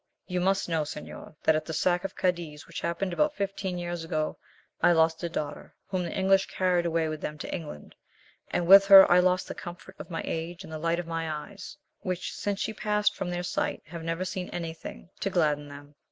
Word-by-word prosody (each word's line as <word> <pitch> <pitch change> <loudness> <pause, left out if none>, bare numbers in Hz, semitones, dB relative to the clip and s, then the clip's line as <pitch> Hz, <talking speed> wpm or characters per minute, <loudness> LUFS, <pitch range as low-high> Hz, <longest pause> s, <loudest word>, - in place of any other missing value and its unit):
"You 180 -1 -2
must 195 +1 +1
know, 165 -2 +1
señor, 150 +1 -7
that 160 - +4
at 155 - 0
the 160 - -5
sack 175 +2 +2
of 195 - -5
Cadiz 170 -5 -2
which 170 - -7
happened 175 +2 -2
about 300 - +1
fifteen 195 -3 -3
years 175 -1 -4
ago, 155 -2 -2 0.4
I 175 - +6
lost 160 0 +3
a 170 - -2
daughter, 150 -3 -5
whom 185 -2 -1
the 170 -2 -3
English 195 0 +3
carried 180 -2 +1
away 165 -1 +1
with 155 -1 -4
them 150 - -4
to - - -6
England, 155 - -7 0.6
and 175 - 0
with 195 +2 +9
her 195 -1 +11
I 180 - +7
lost 185 0 +2
the - - -5
comfort 175 +1 -9
of - - -8
my 165 -2 -3
age 170 +3 -4
and 160 - -10
the 155 - -4
light 165 +1 +1
of 175 - -3
my 165 -1 -3
eyes, 185 +6 -7 0.2
which 185 -2 -3
since 200 -1 -2
she 220 - -2
passed 210 0 +1
from 180 - -3
their 175 0 -2
sight, 180 - -2
have 165 +1 -8
never 165 +3 -2
seen 185 -1 -4
anything 165 +1 -7
to 195 - -1
gladden 150 -5 +1
them. 145 0 -12
175 Hz, 220 wpm, -28 LUFS, 160-185 Hz, 0.6 s, her